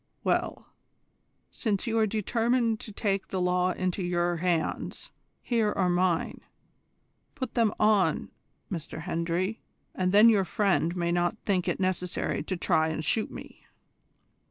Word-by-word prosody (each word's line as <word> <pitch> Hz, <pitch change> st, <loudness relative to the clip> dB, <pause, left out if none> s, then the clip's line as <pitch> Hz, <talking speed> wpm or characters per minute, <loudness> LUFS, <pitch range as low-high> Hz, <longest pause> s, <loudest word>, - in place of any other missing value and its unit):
Well, -, -, -1 dB, 0.9 s
since 210 Hz, -5 st, -1 dB
you 225 Hz, -1 st, +1 dB
are 220 Hz, -, +3 dB
determined 225 Hz, +2 st, +1 dB
to 215 Hz, -, -8 dB
take 200 Hz, -1 st, -1 dB
the 190 Hz, -, -3 dB
law 180 Hz, 0 st, +2 dB
into 185 Hz, +1 st, -2 dB
your 175 Hz, -1 st, 0 dB
hands 170 Hz, -1 st, -2 dB, 0.3 s
here 225 Hz, -4 st, +1 dB
are 180 Hz, -2 st, +1 dB
mine. 175 Hz, -1 st, 0 dB, 0.9 s
Put 260 Hz, -4 st, -4 dB
them 230 Hz, -3 st, +3 dB
on 210 Hz, -2 st, +2 dB, 0.4 s
M. 170 Hz, -, -1 dB, 0.2 s
Hendry, 175 Hz, +4 st, -2 dB, 0.3 s
and 185 Hz, -1 st, 0 dB
then 210 Hz, +3 st, +7 dB
your 210 Hz, -4 st, +5 dB
friend 185 Hz, -3 st, +1 dB
may 170 Hz, -1 st, 0 dB
not 175 Hz, +4 st, +1 dB
think 185 Hz, -3 st, +1 dB
it -, -, -1 dB
necessary 185 Hz, -1 st, -1 dB
to 185 Hz, -, -3 dB
try 160 Hz, -2 st, +2 dB
and 160 Hz, -1 st, -3 dB
shoot 220 Hz, +8 st, +1 dB
me." -, -, -11 dB
185 Hz, 140 wpm, -28 LUFS, 175-215 Hz, 0.9 s, then